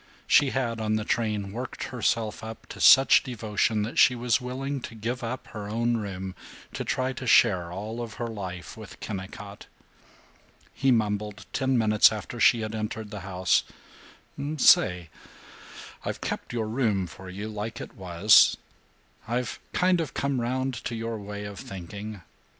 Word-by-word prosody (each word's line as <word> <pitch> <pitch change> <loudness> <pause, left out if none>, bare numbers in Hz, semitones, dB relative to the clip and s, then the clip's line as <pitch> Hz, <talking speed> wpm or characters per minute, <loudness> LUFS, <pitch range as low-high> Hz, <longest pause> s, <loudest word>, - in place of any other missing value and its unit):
She 145 - +5
had, 120 -4 -2
on 110 0 +1
the 110 - -1
train, 105 -4 -1
worked 120 +4 -5
herself 115 -3 -1
up 110 0 -8
to - - -8
such 135 0 +8
devotion 110 -3 -1
that 110 - -2
she 125 - +6
was 120 -1 +1
willing 135 +2 -4
to 115 - -8
give 120 +3 -4
up 120 +2 -4
her 105 -2 -7
own 115 +2 +1
room, 95 -3 -5 0.4
to - - -3
try 130 +1 -1
to 130 0 -6
share 95 -8 +4
all 110 +6 -5
of 115 -2 -6
her 120 - -3
life 95 -7 -6
with 110 -2 -11
Kennicott. 100 0 -7 1.1
He 135 - +1
mumbled, 105 -3 0
ten 130 -2 +1
minutes 110 -2 +5
after 110 +3 -6
she 115 +1 +5
had 110 0 -4
entered 110 -1 -4
the 105 - -5
house, 95 -2 +1 1.0
"Say, 90 - +5 0.9
I've - - -4
kept - - -4
your 115 -2 -2
room 110 -5 0
for 95 +3 -11
you 100 +3 -6
like 110 +1 -5
it - - -8
was. 95 +2 +5 0.7
I've 120 +1 -2
kind 180 -1 +2
of 160 - -5
come 140 -3 0
round 130 +2 -1
to 120 - -3
your 115 0 -4
way 105 0 -6
of 100 -1 -7
thinking. 100 +2 -8
110 Hz, 160 wpm, -27 LUFS, 100-120 Hz, 1.1 s, such